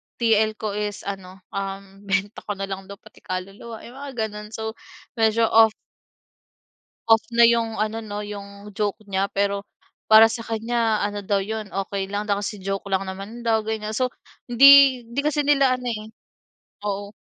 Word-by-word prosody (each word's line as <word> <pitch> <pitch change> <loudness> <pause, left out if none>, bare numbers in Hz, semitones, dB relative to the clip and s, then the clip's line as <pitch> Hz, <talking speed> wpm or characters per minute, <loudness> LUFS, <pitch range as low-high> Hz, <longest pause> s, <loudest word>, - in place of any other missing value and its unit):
TL 220 -2 +2
ko 215 -1 -4
is 205 0 -4
ano, 190 -1 -7
um, 195 0 -6
benta 195 +2 -1
ko 205 - -3
na 195 - -5
lang 195 0 -5
daw 200 - -8
pati 215 +1 -19
kaluluwa, 195 +5 -6
yung 245 +3 -12
mga 265 -6 -4
gano'n 210 +1 -10
so, 220 0 -5 0.4
medyo 225 0 +3
off 220 -1 +6 1.3
off 225 0 +6
na 235 0 +6
yung 230 -1 +2
ano 215 +1 -1
'no, 210 -1 -5
yung 200 0 -9
joke 205 0 -1
niya. 195 0 -1
Pero 200 0 0 0.5
para 220 +1 +9
sa 230 +1 -2
kanya 225 0 0
ano 205 0 -3
daw 200 +1 +2
yun 220 +2 -4
okey 195 0 -2
lang 205 +1 -3
daw 200 - +2
kasi 205 +1 -4
joke 195 +1 -3
lang 195 0 0
naman 200 +5 -8
daw 225 -1 +3
ganyan. 215 0 -4
So, 255 +3 0 0.4
hindi, 275 +1 +8
hindi 235 +4 -3
kasi 295 0 0
nila 275 -3 +4
ano, 250 - -10
eh, 225 -3 -3 0.8
oo 200 0 -2
215 Hz, 175 wpm, -23 LUFS, 200-230 Hz, 1.3 s, para